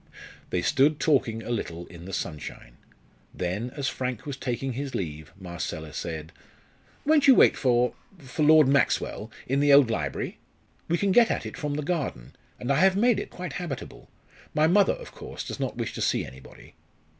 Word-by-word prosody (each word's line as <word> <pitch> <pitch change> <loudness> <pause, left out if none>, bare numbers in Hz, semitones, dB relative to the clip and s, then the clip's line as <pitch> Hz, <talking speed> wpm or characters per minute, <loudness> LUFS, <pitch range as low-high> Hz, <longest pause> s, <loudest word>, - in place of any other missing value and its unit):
They 90 - -1
stood 145 - +3
talking 115 -7 +1
a 120 - -5
little 85 -7 -3
in 85 -1 -12
the 95 - -7
sunshine. 75 -8 -6 0.6
Then, 95 +7 -2
as 140 -2 -2
Frank 125 -4 -3
was 145 -2 -4
taking 130 0 -3
his 135 0 -4
leave, 80 -7 -5
Marcella 85 -4 -5
said: 80 0 -5 0.7
"Won't 295 -1 +4
you 265 - +9
wait - - +6
for 125 -2 +2 0.2
for 135 -2 -6
Lord 155 -1 +7
Maxwell, 135 -5 +1 0.2
in 135 +2 0
the 145 0 +4
old 140 -4 +7
library? 70 -10 -3 0.5
We 170 - +1
can 200 +1 +1
get 235 +3 +6
at - - -1
it - - -6
from 145 -1 -3
the 150 - -2
garden, 140 - -3 0.2
and 125 - -2
I 140 - +3
have 190 +1 +5
made 225 0 +3
it - - -5
quite 180 0 -7
habitable. 170 -7 -6 0.5
My 155 +1 +4
mother, 190 +4 +4
of - - -10
course, - - -8
does - - -6
not - - -3
wish - - -3
to - - -5
see - - +1
anybody." 65 +1 -14
130 Hz, 185 wpm, -26 LUFS, -, 0.7 s, you